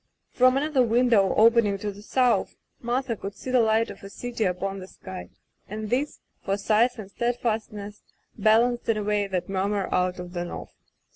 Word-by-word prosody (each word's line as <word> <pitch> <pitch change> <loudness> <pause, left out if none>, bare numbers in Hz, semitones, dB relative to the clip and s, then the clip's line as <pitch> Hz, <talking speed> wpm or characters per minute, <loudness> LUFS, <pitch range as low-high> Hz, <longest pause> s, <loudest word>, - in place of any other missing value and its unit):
From 255 +1 +4
another 290 -1 +2
window 230 -4 +3
opening 225 -2 +5
to 205 +1 -4
the 200 +1 -12
south, 250 +2 +1 0.3
Martha 245 0 -1
could 200 0 -7
see 255 - -6
the 255 - +4
light 225 0 +2
of - - -12
a 195 - -9
city 235 +1 -3
upon 195 +2 -2
the 185 - -9
sky, 185 -1 -9 0.4
and 215 +1 -5
this, 275 +4 -1 0.2
for 195 +1 0
size 225 +5 +2
and 200 -3 -9
steadfastness, 215 -3 -3 0.3
balanced, 230 +3 +3
in 225 - +3
a 210 - -2
way, 205 -1 0
that 180 -2 -2
murmur 195 +1 -1
out 180 0 +1
of 180 0 -8
the 175 -1 -2
north. 175 - -7
215 Hz, 185 wpm, -26 LUFS, 195-240 Hz, 0.4 s, opening